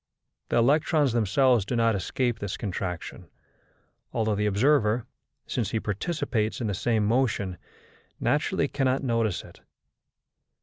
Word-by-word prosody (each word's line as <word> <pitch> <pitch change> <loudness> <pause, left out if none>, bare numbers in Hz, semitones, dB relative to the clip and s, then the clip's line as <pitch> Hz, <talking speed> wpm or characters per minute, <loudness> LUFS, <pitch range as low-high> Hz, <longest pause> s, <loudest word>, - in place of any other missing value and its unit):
The - - 0
electrons 145 +2 +3
themselves 120 +1 +3
do 120 - -3
not 115 -1 +3
escape 120 +4 -1
this 100 -2 -4
contraction, 95 -4 -5 0.8
although 110 -1 0
the 105 +1 0
observer, 110 +1 +2 0.4
since 115 -6 -2
he 110 - -1
participates 110 - -2
in 120 - -2
the 105 - -1
same 110 +2 +1
motion, 105 -5 0 0.6
naturally - - +1
cannot 135 -1 0
notice 115 -6 0
it. - - -16
115 Hz, 125 wpm, -26 LUFS, 105-130 Hz, 0.8 s, electrons